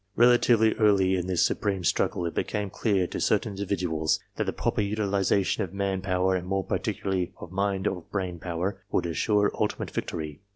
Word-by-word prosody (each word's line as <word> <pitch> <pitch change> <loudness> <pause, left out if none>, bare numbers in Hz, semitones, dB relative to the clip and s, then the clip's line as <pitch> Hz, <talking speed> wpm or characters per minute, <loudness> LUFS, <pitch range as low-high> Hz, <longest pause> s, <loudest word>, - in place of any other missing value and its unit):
Relatively 120 -2 +5
early 100 -3 +4
in 90 -1 -2
this 90 -2 +2
supreme 100 -3 -1
struggle, 85 +1 +1
it 85 - -3
became 105 -2 -2
clear 100 -4 +1
to - - -5
certain 110 - +1
individuals 90 -6 -1 0.2
that - - -1
the - - -1
proper - - -1
utilization 100 -1 +1
of 95 0 -7
man 100 -1 -1
power, 95 0 +1
and 90 0 -3
more 95 0 0
particularly 95 -4 -2
of 85 - -9
mind 100 0 -1
or 95 -3 -1
brain 90 -4 -3
power, 90 +4 -3
would - - +1
assure 105 +5 +2
ultimate - - -1
victory. 75 -1 -4
95 Hz, 175 wpm, -27 LUFS, 90-100 Hz, 0.2 s, Relatively